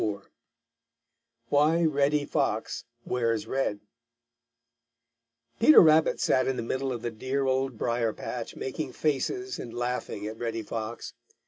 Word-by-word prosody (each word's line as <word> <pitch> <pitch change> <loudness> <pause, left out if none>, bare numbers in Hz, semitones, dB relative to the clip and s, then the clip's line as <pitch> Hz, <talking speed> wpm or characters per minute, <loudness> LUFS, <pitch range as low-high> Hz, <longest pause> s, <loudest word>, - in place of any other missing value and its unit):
IV 100 -2 -3 1.2
WHY 155 +4 +3
REDDY 145 -1 +2
FOX 135 -8 -1 0.2
WEARS 115 -3 0
RED 110 -5 -1 1.8
Peter 305 +7 +8
Rabbit 160 -1 +5
sat 130 - +2
in 130 -1 0
the - - -2
middle 130 +3 -2
of 120 -2 -5
the 120 - -2
dear 130 +5 -2
Old 130 -2 0
Briar 115 -1 0
patch - - -6
making 130 0 -4
faces 375 - -1
and 120 - -7
laughing 120 -4 -3
at 110 +1 -6
Reddy 115 -1 -3
Fox. 115 +3 -5
130 Hz, 130 wpm, -28 LUFS, 115-145 Hz, 1.8 s, Peter